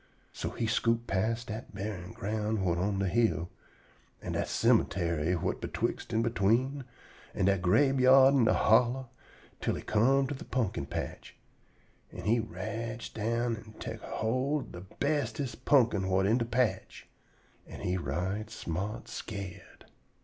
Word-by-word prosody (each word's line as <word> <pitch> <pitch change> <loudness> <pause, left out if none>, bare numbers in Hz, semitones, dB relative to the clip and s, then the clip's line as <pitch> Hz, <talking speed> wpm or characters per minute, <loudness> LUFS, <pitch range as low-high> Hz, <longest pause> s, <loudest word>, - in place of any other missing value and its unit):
So - - -3
he 115 - -3
scoot 115 +1 +1
past 115 +5 0
dat 110 -1 -7
buryin' 95 -3 -5
ground 110 +2 -2
whut 90 -3 0
on 100 +2 0
de 95 0 0
hill, 90 -4 +1 0.7
an' - - -5
dat - - -1
cemuntary 85 -2 +2
whut - - -2
betwixt - - -3
an' 115 0 +2
between, 120 +5 +1 0.5
an' 95 - +1
dat 100 -2 +3
grabeyard 135 +6 +6
in 130 -4 +4
de 110 - +4
hollow, 125 0 +3 0.5
twell - - 0
he - - -6
come 135 +6 +3
to 140 - -3
de 135 - -8
pumpkin 105 - -2
patch, - - -6 0.8
an' - - -8
he 115 +3 +3
rotch 115 +1 -5
down 115 +2 0
an' 110 -1 -12
tek 110 -1 -6
erhold 130 +5 -1
ob 90 +2 -10
de - - -20
bestest 140 -4 -2
pumpkin 120 -8 +4
whut 95 0 +2
in 110 +5 +3
de 115 - 0
patch. 115 -5 -1 0.6
An' - - -9
he 90 - 0
right 95 +6 -2
smart 100 0 -4
scared. 100 -5 -8
110 Hz, 150 wpm, -30 LUFS, 95-120 Hz, 0.8 s, grabeyard